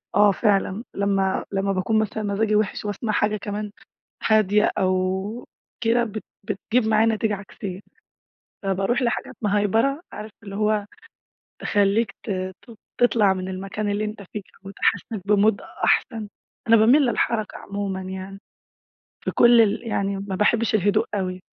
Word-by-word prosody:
آه، 205 0 +6
فعلًا 200 +1 +1
لمّا 195 -1 0
لمّا 195 0 0
باكون 195 +4 +1
مثلًا 215 0 -2
مزاجي 210 +1 +1
وحش 210 0 0
وأسمع 210 +2 -2
حاجة 210 +1 +1
كمان 205 0 -5 0.6
هادية 210 -1 +4
أو 190 +4 -1 0.3
كده 235 +1 +2
بت 215 -1 -6 0.2
بتجيب 215 +4 0
معايا 220 +1 +4
نتيجة 220 -1 +1
عكسية، 195 -1 -7 0.8
فباروح 195 +6 0
لحاجات 240 -1 -1
مهيبرة 215 +7 +2
عارف 215 +1 -7
اللي 200 -2 -7
هو 210 0 +1 0.8
تخليك 205 +1 +2
ت - - -6
ت 185 +4 -5 0.3
تطلع 225 -5 +4
من 185 0 -4
المكان 195 +3 -4
اللي 205 +1 -1
أنت 210 -1 -5
فيه، 210 - -3 0.2
وتحسسك 200 +2 -1
بMood 210 0 +3 0.2
أحسن. 220 -2 +1 0.4
أنا 230 - +7
باميل 235 +7 +6
للحركة 220 -1 -1
عمومًا 200 -1 -4
يعني، 190 +1 -7 0.9
في - - 0
كل 240 -1 +6
ال 220 0 +2
يعني 200 -2 -1
ما 195 -1 -4
باحبش 225 +3 +2
الهدوء 210 +2 +2
أوي. 185 -2 -2
205 Hz, 140 wpm, -23 LUFS, 195-220 Hz, 0.9 s, أنا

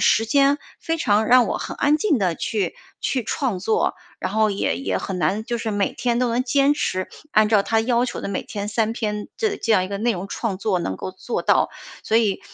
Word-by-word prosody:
时 225 - +4
间 280 +4 +4 0.2
非 330 0 -1
常 215 -7 +2
让 250 -1 +6
我 - - -2
很 - - -5
安 295 +1 +3
静 310 - +1
地 180 -4 +1
去 200 -2 -2 0.3
去 255 -3 0
创 230 -4 -1
作， 215 +4 +1 0.2
然 - - -3
后 215 0 +3
也 200 - 0
也 270 - -1
很 190 -2 -4
难 205 +5 0
就 235 -1 -2
是 225 -1 -3
每 205 -1 0
天 240 -1 0
都 250 -1 +2
能 240 +2 +1
坚 280 +2 +3
持 185 -9 -2 0.2
按 215 0 +5
照 210 -3 +4
它 225 +2 +1
要 240 +1 +2
求 - - -4
的 - - -4
每 200 - -2
天 205 -1 -5
3 220 +1 0
篇 210 -2 -3
的 425 -3 0
这 225 - +1
样 185 -3 +4
一 - - -6
个 200 - -3
内 235 +3 +1
容 185 0 -5
创 210 -4 -2
作 200 -3 0
能 95 - -3
够 185 - -5
做 190 +6 -4
到。 - - +3 0.3
所 220 - +1
以， 215 -4 +2
220 Hz, 250 characters per minute, -22 LUFS, 200-250 Hz, 0.3 s, 让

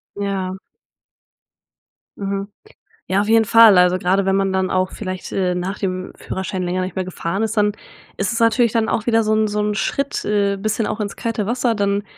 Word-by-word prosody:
Ja. 195 -2 -2 1.6
Mhm. 195 0 -3 0.6
Ja, 190 +1 +2
auf 205 - -1
jeden 225 0 +5
Fall. 220 -2 +7
Also 180 0 +4
gerade 190 +2 +1
wenn 195 - +2
man 195 0 +1
dann 190 0 0
auch 185 0 +1
vielleicht, 185 -3 -6
äh, 185 -2 0
nach 180 +3 -3
dem 185 -1 -3
Führerschein 190 -1 -4
länger 180 +1 -1
nicht 185 -1 -5
mehr 190 - -1
gefahren 185 +2 -3
ist, 220 +1 -3
dann 210 -1 +3 0.4
ist 195 -1 -1
es 230 - -2
natürlich 230 0 +3
dann 225 -1 +1
auch 215 - -1
wieder 225 -1 +3
so 215 0 0
'n 215 0 +2
so 210 0 -2
'n 210 0 0
Schritt, 275 +8 -2
äh, 200 -1 +1
bisschen 215 +2 -1
auch - - -3
ins 205 -1 -3
kalte 230 -3 -2
Wasser, 240 +1 0
dann 200 0 0
200 Hz, 200 wpm, -20 LUFS, 185-220 Hz, 1.6 s, Fall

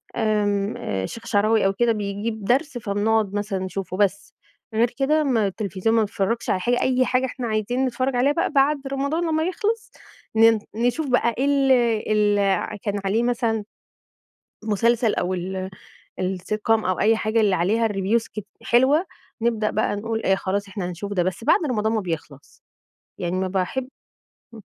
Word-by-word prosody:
آمم 210 -2 0
الشيخ 95 - -4
الشعراوي 215 -1 +2
أو 195 - +2
كده 235 +3 +2
بيجيب 210 +1 -3
درس 265 +2 +1
فبنقعد 210 -1 0
مثلًا 205 -2 -2
نشوفه، 185 0 -4
بس. 200 0 0 0.4
غير 230 +2 +3
كده 305 +3 +2
ما 230 -7 +2
التلفزيون 200 +2 -1
ما 225 - +4
بنتفرجش 215 +2 -1
على 185 - +2
حاجة، 245 +6 +1
أي 255 0 +2
حاجة 255 +1 +1
إحنا 250 -2 -4
عايزين 225 +4 0
نتفرج 255 +1 -1
عليها 265 +4 +3
بقى 335 - 0
بعد 285 +1 +3
رمضان 280 +5 -1
لما 315 0 +1
يخلص، 425 +5 -2 0.4
ن 225 0 +6 0.2
نشوف 245 +6 0
بقى 235 -2 +2
إيه 270 - +1
ال 275 -1 +3 0.4
ال 210 -1 +3
ع 200 +1 0
كان 205 0 -3
عليه 220 +5 +1
مثلًا 230 -3 0 1.0
مسلسل 225 +2 +2
أو 180 +1 -1
ال 185 +1 -4 0.5
الsitcom 190 +4 -3
أو 185 0 0
أي 220 +1 +4
حاجة 220 +1 +1
اللي 200 -3 +3
عليها 220 +6 +2
الreviews 205 +3 0
كتي 210 -2 -6 0.2
حلوة، 275 +9 +3 0.4
نبدأ 225 -2 +1
بقى 210 -1 0
نقول 225 +1 -3
آآ، 190 - +4
خلاص، 200 +1 -2
إحنا 195 -3 -4
هنشوف 200 +3 -6
ده. 180 -3 +1
بس 185 +5 -3
بعد - - +4
رمضان 220 -1 0
ما 220 - +1
بيخلص. 155 -6 -7 0.6
يعني 175 +1 -2
ما 190 0 -1
باحب 195 +8 -2 0.7
امم. 220 - -11
220 Hz, 165 wpm, -23 LUFS, 195-245 Hz, 1.0 s, ن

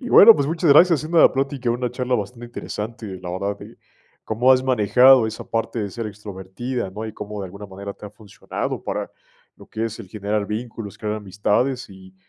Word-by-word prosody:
Y, 250 - -6
bueno, 225 +2 +9
pues 140 - 0
muchas 165 -1 +1
gracias, 165 -1 +6
siendo 165 +2 0
la - - +7
plática, 135 -2 -1
una 120 0 -1
charla 125 0 -1
bastante 120 +2 -4
interesante, 115 -1 -6
la 90 - -6
verdad, 100 +2 -3
eh, - - -12 0.5
cómo 120 +4 +2
has 130 0 +3
manejado 125 +1 +5
esa 110 0 -6
parte 115 +1 -2
de 100 -2 -3
ser 115 0 -5
extrovertida, 100 +2 -6
¿no? 110 +3 -6
Y 110 - -7
cómo, 105 0 -7
de 95 - -4
alguna 100 +3 -10
manera, 100 +1 -7
te 105 - -11
ha - - -11
funcionado 105 -2 -6
para - - -4 0.5
lo - - -15
que 110 +1 -4
es 115 0 -5
el 100 -5 -10
generar 105 0 -2
vínculos, 110 -1 -6
crear 105 0 -3
amistades, 105 +6 -1
y 95 -1 -15
110 Hz, 205 wpm, -22 LUFS, 100-125 Hz, 0.5 s, bueno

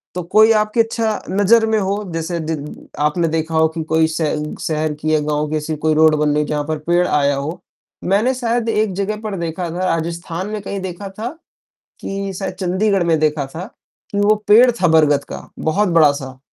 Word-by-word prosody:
तो 180 - -2
कोई 220 +1 +7
आपकी 215 +2 -1
अच्छा 225 -1 -1
नज़र 205 +4 +4
में 220 - +2
हो, 200 +1 -1
जैसे 165 +1 -3
दि 160 0 -3 0.5
आपने 165 +3 +1
देखा 160 0 -2
हो 160 0 +4
कि 160 0 -5
कोई 160 0 +3
स 160 +1 -4 0.4
शहर 155 -3 -1
की 155 0 0
या 155 - +3
गाँव 150 0 -1
की 155 - -2
ऐसी 155 +1 -3
कोई 155 +1 +1
रोड 155 0 +5
बन 150 0 +1
रही 150 +1 +1
है - - -5
जहाँ 150 -1 -1
पर 155 0 -1
पेड़ 175 +1 +3
आया 145 -1 +2
हो? 145 +5 -5 0.4
मैंने 210 +7 +2
शायद 240 -2 -1
एक 215 -3 0
जगह 200 +3 -2
पर 215 -2 -4
देखा 170 +1 -3
था, 180 +2 -2
राजस्थान 170 +2 -4
में 215 -1 -4
कहीं 200 0 -5
देखा 190 +1 -6
था, 215 +4 -6 0.7
कि 195 0 -4
शायद 190 -2 -4
चंडीगढ़ 190 +2 0
में 165 -2 +2
देखा 150 -2 0
था, 160 +6 -7 0.5
कि 200 - -1
वो 205 +1 +4
पेड़ 240 +4 +7
था 180 - +4
बरगद 150 -3 +3
का, - - -6 0.2
बहुत 195 +6 +1
बड़ा-सा 145 -6 +2
170 Hz, 205 wpm, -18 LUFS, 155-205 Hz, 0.7 s, कोई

